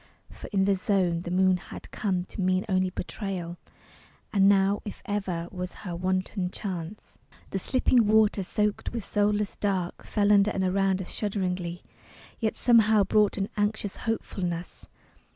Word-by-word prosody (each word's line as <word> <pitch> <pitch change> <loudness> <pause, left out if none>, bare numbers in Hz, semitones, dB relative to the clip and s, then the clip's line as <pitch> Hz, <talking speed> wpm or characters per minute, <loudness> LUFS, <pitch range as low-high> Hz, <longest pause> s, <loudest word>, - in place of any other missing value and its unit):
For - - -10
in 195 -2 +2
the 200 - +3
Zone 185 -3 +1
The 175 - -6
moon 185 +1 +3
had - - -11
come 185 -4 -1
to 195 - -7
mean 185 +1 +1
only 185 -2 +1
betrayal, 180 -2 -5 0.7
And 195 -1 +5
now, 200 0 +3
if 205 - -8
ever, 190 -5 -2
was 180 -1 -5
her 175 -2 -4
wanton 185 +1 -1
chance. 185 0 -7 0.3
The 195 - -1
slipping 250 0 +2
water 215 -1 +4
soaked 210 +3 -1
with 230 -4 -4
soulless 205 0 0
dark 190 -4 -2
Fell 205 -1 +2
under 200 0 +5
and 195 -2 -1
around 190 0 +1
us - - -10
shudderingly, 180 -4 -2 0.6
Yet 220 -2 0
somehow 220 -3 +5
brought 210 +1 +2
an 195 0 -1
anxious 205 -1 -1
hopefulness. 180 -6 -4
195 Hz, 150 wpm, -27 LUFS, 185-210 Hz, 0.7 s, And